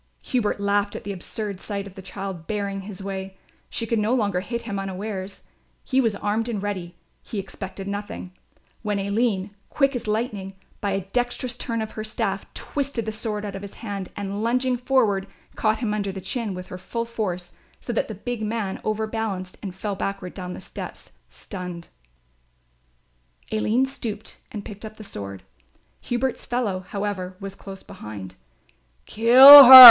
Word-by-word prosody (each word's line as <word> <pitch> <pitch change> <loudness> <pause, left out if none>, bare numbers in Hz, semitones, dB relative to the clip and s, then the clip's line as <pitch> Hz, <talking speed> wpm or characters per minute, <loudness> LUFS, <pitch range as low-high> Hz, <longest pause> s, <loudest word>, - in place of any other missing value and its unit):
Hubert 235 -5 0
laughed 205 0 +1
at - - -6
the 205 - -4
absurd 200 +1 -5
sight 200 -1 -4
of 200 - -10
the 190 - -9
child 190 -3 -6
barring 200 -2 -2
his 195 -1 -8
way. 190 -1 -5 0.3
She 230 - -3
could 230 0 0
no 215 +4 +2
longer 200 -6 +1
hit 235 +5 -4
him 200 -4 -3
unawares; 195 0 -5 0.4
he 265 0 +2
was 225 -4 +1
armed 215 +3 -1
and 220 -4 -2
ready, 185 -4 -4 0.3
he 220 - -7
expected 195 0 -6
nothing; 200 -2 -5 0.5
when 210 -2 -1
Aline, 200 0 0 0.2
quick 275 -2 +2
as 240 -2 -4
lightning, 210 -3 -2 0.2
by 200 -2 -1
a 195 - 0
dexterous 245 0 0
turn 230 -3 -2
of 220 - -6
her 215 - -5
staff, 220 +1 -2
twisted 275 -5 -2
the 220 - -2
sword 210 -1 -3
out 200 -1 -5
of 195 - -6
his 200 -1 -9
hand, 200 -4 -5
and 200 0 -4
lunging 250 +3 +2
forward, 240 -6 +2 0.3
caught 215 0 +2
him 220 -3 -1
under 200 -2 -1
the 190 - -6
chin 215 0 -3
with 180 0 -6
her 185 - -7
full 230 +5 -3
force 185 -7 -3 0.3
so 240 - -4
that - - 0
the 220 - -6
big 240 +3 -4
man 215 -3 -2
overbalanced 215 -3 -2
and 190 -3 -6
fell 205 +1 -3
backward 195 -1 -4
down 180 -2 -6
the - - -9
steps, - - -9 0.2
stunned. 180 -3 -8 1.6
Aline 220 +4 +2
stooped 225 -5 -6
and 205 -2 -6
picked 210 0 -9
up 215 0 -8
the 215 - -9
sword. 100 - -7 0.6
Hubert's 245 +1 -2
fellow, 235 -7 -1
however, 195 -2 -3
was 195 -1 -6
close 195 -1 -10
behind. 100 -3 -8 0.7
"Kill 265 +5 +11
her!" 260 +1 +15
205 Hz, 175 wpm, -24 LUFS, 195-230 Hz, 1.6 s, her